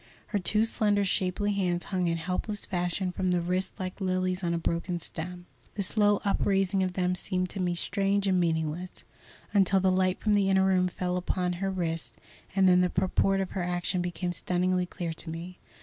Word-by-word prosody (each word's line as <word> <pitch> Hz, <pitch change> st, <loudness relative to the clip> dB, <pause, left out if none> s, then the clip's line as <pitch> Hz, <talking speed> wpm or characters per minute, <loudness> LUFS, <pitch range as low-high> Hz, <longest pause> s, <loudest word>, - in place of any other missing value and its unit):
Her 205 Hz, -, 0 dB
two 210 Hz, +4 st, +3 dB
slender, 205 Hz, -3 st, +1 dB
shapely 190 Hz, +2 st, 0 dB
hands 180 Hz, -3 st, 0 dB
hung 185 Hz, -3 st, -1 dB
in 165 Hz, 0 st, 0 dB
helpless 185 Hz, +5 st, -3 dB
fashion 180 Hz, 0 st, -1 dB
from 185 Hz, +1 st, -1 dB
the 180 Hz, -1 st, +2 dB
wrists 180 Hz, +2 st, -2 dB
like 185 Hz, +1 st, -5 dB
lilies 185 Hz, 0 st, 0 dB
on 170 Hz, -, 0 dB
a 170 Hz, -, 0 dB
broken 170 Hz, +2 st, -1 dB
stem. 175 Hz, +1 st, -5 dB, 0.3 s
The 200 Hz, -, -1 dB
slow 205 Hz, +1 st, +3 dB
upraising 195 Hz, -1 st, +2 dB
of 185 Hz, -1 st, 0 dB
them 180 Hz, 0 st, +1 dB
seemed 185 Hz, 0 st, -2 dB
to -, -, -6 dB
me 175 Hz, -1 st, 0 dB
strange 195 Hz, +3 st, 0 dB
and 185 Hz, -2 st, +3 dB
meaningless, 165 Hz, +1 st, -2 dB, 0.5 s
until 195 Hz, -1 st, +4 dB
the 190 Hz, 0 st, +3 dB
light 185 Hz, 0 st, +1 dB
from 215 Hz, -, +1 dB
the 200 Hz, -1 st, +3 dB
inner 190 Hz, 0 st, +4 dB
room 185 Hz, -1 st, +3 dB
fell 180 Hz, 0 st, -2 dB
upon 180 Hz, 0 st, -1 dB
her 195 Hz, -, 0 dB
wrists, 165 Hz, -4 st, -3 dB, 0.4 s
and 190 Hz, -1 st, +5 dB
then 180 Hz, 0 st, +6 dB
the 180 Hz, -, +2 dB
purport 190 Hz, +2 st, +1 dB
of 190 Hz, -, -4 dB
her 190 Hz, -, -2 dB
action 175 Hz, +1 st, -1 dB
became 175 Hz, 0 st, -2 dB
stunningly 180 Hz, +1 st, 0 dB
clear 170 Hz, -2 st, -4 dB
to 165 Hz, -, -9 dB
me. 170 Hz, +3 st, -7 dB
185 Hz, 195 wpm, -28 LUFS, 175-195 Hz, 0.5 s, then